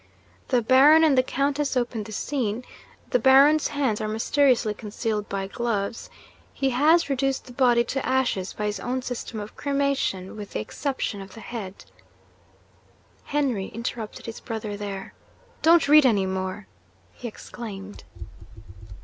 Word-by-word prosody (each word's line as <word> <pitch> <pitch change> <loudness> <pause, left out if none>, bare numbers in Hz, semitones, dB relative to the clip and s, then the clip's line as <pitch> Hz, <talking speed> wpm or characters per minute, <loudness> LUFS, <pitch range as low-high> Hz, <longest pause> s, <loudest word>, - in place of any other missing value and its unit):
The 245 -3 +2
Baron 280 +7 +6
and 305 -4 +5
the 255 - +5
Countess 275 +1 -1
open 240 -2 -1
the 220 - -9
scene. 245 0 -2 0.5
The 250 - +3
Baron's 275 +5 +6
hands 270 -7 -1
are 215 - -2
mysteriously 230 +1 +2
concealed 210 0 -4
by 195 -1 -2
gloves. 220 0 -3 0.5
He 270 -1 0
has 310 +7 +4
reduced 270 -1 -1
the 250 - -12
body 240 -2 +4
to 270 +3 -3
ashes 255 -8 0
by 210 - -4
his 210 -1 -2
own 255 +3 -3
system 245 -3 -5
of 205 +1 -8
cremation, 280 -10 -1
with 210 -2 -8
the - - -2
exception 240 - -3
of 195 0 -11
the - - -10
head 210 -5 -7 0.7
' - - -34
Henry 265 -10 -1
interrupted 230 -1 -6
his 230 - -7
brother 220 -3 -5
there. 200 -1 -6 0.5
'Don't 335 -1 +5
read 300 -1 +7
any 205 -5 +2
more!' 190 +2 -3 0.5
he 245 - -7
exclaimed. 205 -3 -9
240 Hz, 150 wpm, -25 LUFS, 210-270 Hz, 0.7 s, read